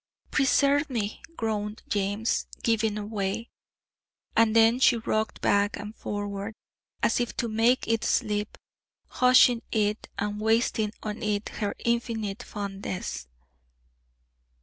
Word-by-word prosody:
"Preserve 285 +1 +3
me!" 220 -5 -3 0.2
groaned 215 -1 -3
James, 205 +2 0 0.2
giving 220 -2 +1
away. 210 +1 -3 0.8
And 225 -1 +4
then 225 +2 +5
she 245 -2 +5
rocked 220 -1 -2
back 205 0 +2
and 210 +2 -7
forward, 205 0 -4 0.5
as - - +3
if 240 - -2
to 235 - 0
make 230 +3 +2
it 225 -1 +1
sleep, 210 0 0 0.5
hushing 250 -1 +5
it, 210 -1 0
and 205 +1 -2
wasting 220 -1 +2
on 215 +1 -4
it 210 -2 -1
her 205 -2 -3
infinite 230 -3 -1
fondness. 195 - -5
215 Hz, 115 wpm, -27 LUFS, 205-230 Hz, 0.8 s, then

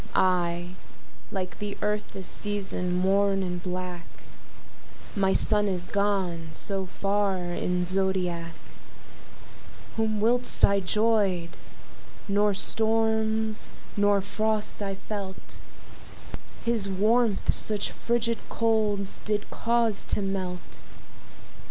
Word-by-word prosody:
I, 175 -1 +2 0.6
like 185 -2 -4
the 205 -1 -4
Earth 210 0 -1
this 190 - -6
season, 195 -3 -1
mourn 195 +2 +2
in 180 -1 -3
black, 180 -1 -5 1.1
My 195 -2 +3
Sun 210 +1 +3
is 180 -2 0
gone 190 -5 0
so 195 +1 -3
far 200 +1 0
in's 180 0 -1
zodiac, 180 -3 0 1.4
Whom 220 -1 +1
whilst 245 +3 +4
I 200 0 +2
'joyed, 195 -3 +2 0.8
nor 205 0 +2
storms, 220 0 +1 0.3
nor 205 -1 +3
frost 215 +2 -1
I 195 -1 -2
felt, 195 -1 -7 1.1
His 225 -4 +1
warmth 215 +2 +2
such 210 -2 +1
fridged 235 -1 0
colds 215 -4 +1
did 210 -1 -1
cause 230 -2 +1
to 205 - +1
melt. 180 - -4
200 Hz, 100 wpm, -27 LUFS, 185-215 Hz, 1.4 s, whilst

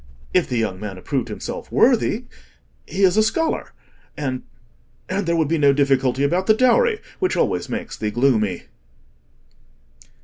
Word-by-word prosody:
If 180 - +2
the 125 - -1
young 105 -5 -1
man 100 -2 -6
approved 130 +6 -2
himself - - -7
worthy—he 235 -4 -1
is 185 +1 +4
a - - +6
scholar—and—and 180 - -3 0.8
there 170 - +2
would 160 -3 +1
be 165 +1 0
no 140 -1 +5
difficulty 135 -2 +2
about 175 +6 +1
the 215 - +5
dowry, 430 - +3 0.2
which 370 -1 0
always - - 0
makes - - -5
thee 105 - -2
gloomy." 110 -6 +1
145 Hz, 135 wpm, -21 LUFS, -, 0.8 s, a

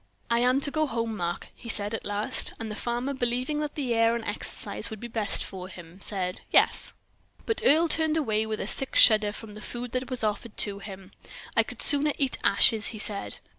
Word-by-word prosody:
"I 235 - +3
am 250 +3 +3
to 285 - 0
go 310 0 +1
home, 230 -3 -2
Mark?" 175 -3 -4
he 230 - -11
said 205 0 +2
at 225 - -4
last. 205 +1 -1
And 225 -1 -5
the - - -5
farmer, 240 +5 -2
believing 255 +3 -1
that 300 0 -4
air 235 -4 +2
and 235 -1 -5
exercise 205 +2 -3
would 220 -2 -8
be 240 - -6
best 220 -3 +1
for 185 -1 -8
him, 175 0 -12
said 185 -3 -3
"Yes." - - +2 0.5
But 450 - -1
Earle 320 +5 +5
turned 320 0 +2
away 220 -7 0
with 215 -1 -3
a - - -3
sick 270 - +3
shudder 215 -2 +6
from 215 0 -9
the 210 - -10
food 240 +2 -6
that 255 0 -3
was 255 -3 -2
offered 210 +1 -2
to 200 -1 -2
him. 195 -2 -10 0.4
"I - - +6
could - - -5
sooner 290 0 +5
eat 270 -2 0
ashes," 220 -2 +4
he 220 - -4
said. 210 -1 -3
230 Hz, 210 wpm, -27 LUFS, 210-255 Hz, 0.5 s, shudder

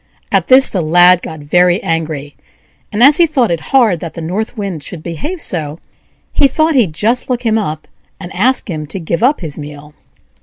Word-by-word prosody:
At - - +1
this 265 +1 +6
the 185 - -2
Lad 175 +3 +5
got 160 -4 -8
very 175 +5 +2
angry; 155 -3 -3 0.6
and 215 +3 +1
as 285 +2 +6
he 340 - +4
thought 260 - +1
it 170 - -1
hard 235 - +3
that 165 -1 -8
the - - -6
North 210 +8 -4
Wind 195 -7 -4
should 160 +1 -6
behave 295 - -5
so, 155 - -4 0.6
he 285 - +4
thought 315 +4 +1
he'd 225 - +2
just 230 +11 -1
look 250 -1 -2
him 225 -1 +1
up, 155 -6 -5 0.3
and 180 -1 -9
ask 245 +8 +1
him 155 -5 -5
to 195 - -6
give 170 +1 -3
up 265 +3 +2
his 155 -4 -6
meal. 150 0 -10
180 Hz, 200 wpm, -14 LUFS, 160-245 Hz, 0.6 s, this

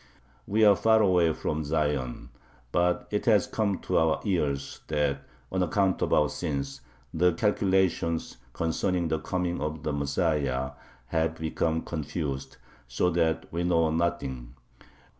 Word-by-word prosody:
We 110 +2 +3
are 100 -1 +7
far 110 +2 +4
away 90 -5 +4
from 80 0 -2
Zion, 75 -5 -1 0.4
but 90 0 +1
it 105 +2 -2
has 105 -5 +5
come 100 -4 -1
to - - +1
our 80 -1 +2
ears 70 -8 -1
that, 75 -2 0 0.3
on 95 - 0
account 95 +2 +1
of - - 0
our 75 - +4
sins, 70 -4 -4 0.3
the 90 +2 +3
calculations 95 - +1
[concerning 85 +3 -1
the 80 0 0
coming 90 +1 -2
of 75 0 -3
the 75 - -1
Messiah] 70 -3 0 0.4
have 80 0 0
become 80 0 -1
confused, 75 -3 -4 0.3
so 75 +9 +1
that 80 -2 +1
we 85 - -1
know 80 -2 +2
nothing. 70 -8 -2
80 Hz, 140 wpm, -28 LUFS, 75-90 Hz, 0.4 s, are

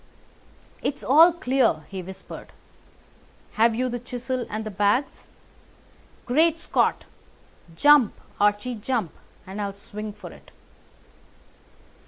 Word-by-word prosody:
"It's 280 - -3
all 320 +6 +7
clear," 260 - +1
he 190 -2 -5
whispered. 190 +1 -10 1.0
"Have 225 +1 +3
you 255 +2 0
the 245 -1 -3
chisel 245 +1 -4
and 220 +1 -4
the 215 - -5
bags? 205 +7 0 1.0
Great 320 +6 +2
Scott! - - +1 0.7
Jump, 290 - +5 0.2
Archie, 205 +4 +1
jump, 225 - -2 0.3
and 195 +3 -6
I'll 200 -1 -4
swing 210 +1 -7
for - - -11
it!" - - -16
235 Hz, 110 wpm, -24 LUFS, 205-260 Hz, 1.0 s, all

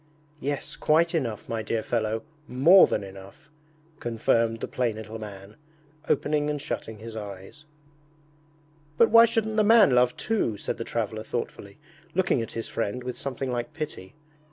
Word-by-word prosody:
'Yes, 145 +1 -3
quite 165 +2 +2
enough, 120 -10 -2
my 115 -1 -2
dear 110 +1 -2
fellow, 110 -1 -1 0.2
more 160 +10 +7
than - - -1
enough!' 100 +11 -12 0.5
confirmed 115 -1 +1
the - - -4
plain 120 -4 -1
little 110 0 -7
man, 100 -1 -10 0.5
opening 150 +1 +1
and 150 -1 -2
shutting 110 -5 -5
his 110 +1 -9
eyes. 100 +7 -9 1.3
'But 230 - +5
why 230 +1 +9
shouldn't 220 -1 -1
the 215 - +5
man 215 -6 +6
love 125 0 +3
too?' 210 - 0
said - - -4
the - - -4
traveller 110 -2 -3
thoughtfully, 105 -3 -5 0.4
looking 185 -9 +2
at 115 - -6
his 115 - -4
friend 115 +3 -3
with 125 0 -4
something 135 -1 -4
like 120 -1 -3
pity. 150 -9 -6
120 Hz, 155 wpm, -26 LUFS, 110-150 Hz, 1.3 s, why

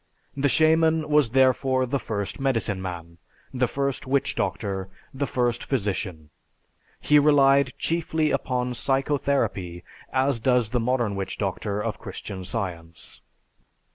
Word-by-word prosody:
The 140 +1 +1
"shaman" 160 +1 +3
was 150 -5 +4
therefore 130 +1 +3
the 135 +2 -1
first 100 -1 -4
medicine 115 -8 0
man, 85 -2 -7 0.3
the 125 -1 +1
first 140 +1 -2
witch 140 +1 +1
doctor, 95 -3 -2 0.2
the 140 +1 -2
first 120 -2 0
physician. 95 - -3 0.7
He 150 0 +5
relied 140 -3 +4
chiefly 160 -2 0
upon 125 -1 -1
psychotherapy 135 -10 -1 0.3
as 130 -1 +1
does 125 -2 +2
the 125 - +1
modern 120 -3 0
witch 95 -1 -4
doctor 100 +1 -2
of - - -3
Christian 95 -2 -7
Science. 85 -5 -6
125 Hz, 125 wpm, -25 LUFS, 100-140 Hz, 0.7 s, He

